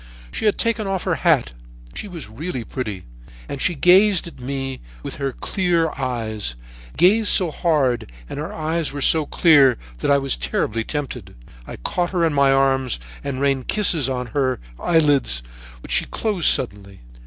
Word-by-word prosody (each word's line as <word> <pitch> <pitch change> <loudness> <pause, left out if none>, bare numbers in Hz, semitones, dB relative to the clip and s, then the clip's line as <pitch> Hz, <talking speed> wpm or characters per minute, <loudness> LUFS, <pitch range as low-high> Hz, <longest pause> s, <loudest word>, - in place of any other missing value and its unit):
"She - - -3
had 210 - +2
taken 225 -3 0
off 190 -2 -2
her 185 - 0
hat. 160 - +3 0.4
She - - -6
was 175 -6 -7
really 125 +3 -5
pretty, 105 -8 -5 0.4
and 140 - -5
she 175 - +2
gazed 185 +4 +5
at 170 - -10
me 135 +1 -4 0.2
with - - -6
her 140 -1 -2
clear 170 - 0
eyes, 110 - -3 0.4
gazed 210 +4 +4
so 180 -5 +3
hard 140 - 0 0.2
and - - -6
her 150 - -5
eyes 160 0 -1
were 145 -1 -3
so 155 -2 +4
clear 140 -8 +5 0.2
that - - -1
I 140 - +5
was 135 -1 0
terribly 105 - -1
tempted. 145 - -5 0.3
I - - -7
caught 175 - -2
her 175 -2 +2
in 160 - 0
my 140 -1 +4
arms 135 - +1 0.2
and 140 -2 -4
rained 135 -2 0
kisses 170 -10 +2
on 125 -1 -2
her 130 -3 0 0.2
eyelids, 145 - +2 0.4
which - - -10
she - - +3
closed 205 -7 -1
suddenly. 100 -5 0
140 Hz, 170 wpm, -21 LUFS, 130-170 Hz, 0.4 s, gazed